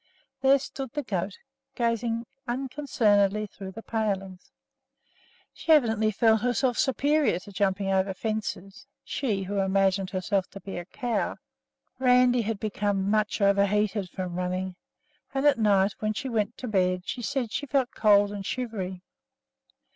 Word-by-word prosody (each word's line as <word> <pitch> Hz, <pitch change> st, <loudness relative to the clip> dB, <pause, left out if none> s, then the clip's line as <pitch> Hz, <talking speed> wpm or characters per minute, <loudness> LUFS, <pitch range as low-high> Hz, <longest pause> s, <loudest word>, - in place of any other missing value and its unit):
There 270 Hz, +1 st, +6 dB
stood 265 Hz, -2 st, -7 dB
the 295 Hz, -, -2 dB
goat 195 Hz, -4 st, -3 dB, 0.4 s
gazing 230 Hz, 0 st, 0 dB, 0.2 s
unconcernedly 240 Hz, -6 st, +1 dB
through 195 Hz, -2 st, -9 dB
the 225 Hz, -, -9 dB
palings. 195 Hz, -4 st, -3 dB, 1.0 s
She 325 Hz, -, -2 dB
evidently 225 Hz, -8 st, +4 dB
felt 220 Hz, +1 st, +3 dB
herself 245 Hz, 0 st, +1 dB
superior 285 Hz, -, +2 dB
to 195 Hz, +3 st, -11 dB
jumping 195 Hz, 0 st, 0 dB
over 190 Hz, 0 st, +2 dB
fences, 210 Hz, -2 st, -4 dB, 0.2 s
she 210 Hz, -8 st, -2 dB
who 200 Hz, +1 st, -2 dB
imagined 195 Hz, 0 st, +2 dB
herself 190 Hz, 0 st, -1 dB
to 195 Hz, -, -8 dB
be 195 Hz, -1 st, -6 dB
a 175 Hz, -, -7 dB
cow! 240 Hz, +5 st, -2 dB, 0.6 s
Randi 250 Hz, -1 st, +4 dB
had 220 Hz, -1 st, -3 dB
become 205 Hz, -2 st, -1 dB
much 215 Hz, 0 st, +1 dB
overheated 200 Hz, 0 st, +2 dB
from 180 Hz, 0 st, -5 dB
running, 185 Hz, 0 st, -2 dB, 0.6 s
and 270 Hz, +1 st, 0 dB
at 290 Hz, -5 st, +5 dB
night, 200 Hz, -2 st, +3 dB
when 215 Hz, 0 st, -1 dB
she 260 Hz, +5 st, -4 dB
went 225 Hz, -1 st, -1 dB
to 255 Hz, -, -6 dB
bed, 185 Hz, -3 st, +1 dB
she 250 Hz, -, -3 dB
said 250 Hz, -2 st, -2 dB
she 285 Hz, -, -3 dB
felt 270 Hz, -2 st, +1 dB
cold 205 Hz, -2 st, +4 dB
and 200 Hz, -1 st, -5 dB
shivery. 190 Hz, -6 st, -4 dB
210 Hz, 145 wpm, -27 LUFS, 195-240 Hz, 1.0 s, There